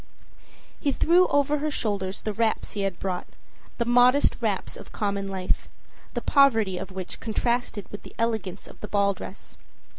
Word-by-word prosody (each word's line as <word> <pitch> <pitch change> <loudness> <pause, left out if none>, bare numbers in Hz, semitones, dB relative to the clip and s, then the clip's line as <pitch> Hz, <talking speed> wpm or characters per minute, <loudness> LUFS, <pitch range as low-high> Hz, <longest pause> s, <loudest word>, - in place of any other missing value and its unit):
He 285 - +1
threw 350 +6 +4
over 285 +1 +2
her 305 +1 0
shoulders 200 -8 -2
the 215 - -2
wraps 225 +1 0
he 205 - -3
had 195 -3 -2
brought, 185 -2 -3 0.5
the 235 - 0
modest 245 +4 +5
wraps 210 -4 -1
of - - -11
common 200 -2 -1
life, 190 -1 -2 0.5
the - - -1
poverty 225 -10 +4
of 190 +1 -6
which 185 -1 -6
contrasted 235 -1 -1
with 205 - -7
the - - -13
elegance 220 -5 -1
of - - -14
the 210 - -5
ball 200 -1 +2
dress. 190 +1 -10
210 Hz, 170 wpm, -26 LUFS, 195-245 Hz, 0.5 s, modest